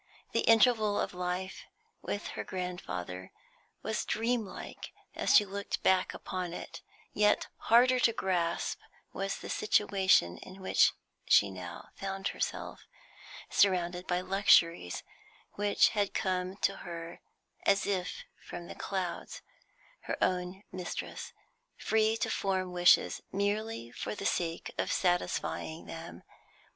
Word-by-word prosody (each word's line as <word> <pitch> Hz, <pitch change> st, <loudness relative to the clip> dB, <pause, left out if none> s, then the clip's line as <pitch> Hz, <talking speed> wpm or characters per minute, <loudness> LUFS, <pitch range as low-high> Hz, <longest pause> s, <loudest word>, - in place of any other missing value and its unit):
The -, -, +1 dB
interval 225 Hz, -2 st, +5 dB
of -, -, -1 dB
life 180 Hz, +1 st, -3 dB, 0.4 s
with 205 Hz, -, -4 dB
her -, -, -5 dB
grandfather 95 Hz, -, -5 dB, 0.5 s
was -, -, -1 dB
dreamlike 230 Hz, -2 st, -3 dB, 0.2 s
as -, -, +2 dB
she 210 Hz, -, +7 dB
looked 200 Hz, +1 st, -4 dB
back 185 Hz, -1 st, +3 dB
upon 180 Hz, -2 st, -4 dB
it; -, -, -7 dB, 0.3 s
yet 210 Hz, 0 st, +3 dB, 0.2 s
harder 250 Hz, +2 st, +6 dB
to 235 Hz, -, +4 dB
grasp 180 Hz, -6 st, -1 dB, 0.3 s
was 195 Hz, +1 st, -2 dB
the -, -, -8 dB
situation 190 Hz, -, +3 dB
in 185 Hz, +1 st, -11 dB
which 190 Hz, -, +4 dB, 0.3 s
she 100 Hz, -1 st, +5 dB
now 90 Hz, -2 st, -8 dB
found 195 Hz, 0 st, -3 dB
herself, -, -, -4 dB, 0.6 s
surrounded 180 Hz, -2 st, +2 dB
by 180 Hz, 0 st, +1 dB
luxuries 175 Hz, -, +3 dB, 0.5 s
which 205 Hz, 0 st, +3 dB
had 205 Hz, -2 st, -1 dB
come 185 Hz, 0 st, -1 dB
to 195 Hz, -, +1 dB
her 170 Hz, -1 st, -7 dB, 0.5 s
as 195 Hz, -, +4 dB
if 185 Hz, -3 st, -2 dB, 0.2 s
from 175 Hz, 0 st, -7 dB
the -, -, -8 dB
clouds, 185 Hz, -3 st, -4 dB, 0.6 s
her -, -, -2 dB
own 180 Hz, +2 st, -1 dB
mistress, 185 Hz, -1 st, -5 dB, 0.5 s
free 220 Hz, 0 st, +2 dB
to -, -, -1 dB
form 190 Hz, -2 st, -1 dB
wishes 175 Hz, 0 st, +4 dB
merely 205 Hz, -, -1 dB
for -, -, -4 dB
the 200 Hz, -, -6 dB
sake 170 Hz, -4 st, -1 dB
of -, -, 0 dB
satisfying 175 Hz, -2 st, -1 dB
them. 165 Hz, +1 st, -8 dB
185 Hz, 125 wpm, -31 LUFS, 175-205 Hz, 0.6 s, she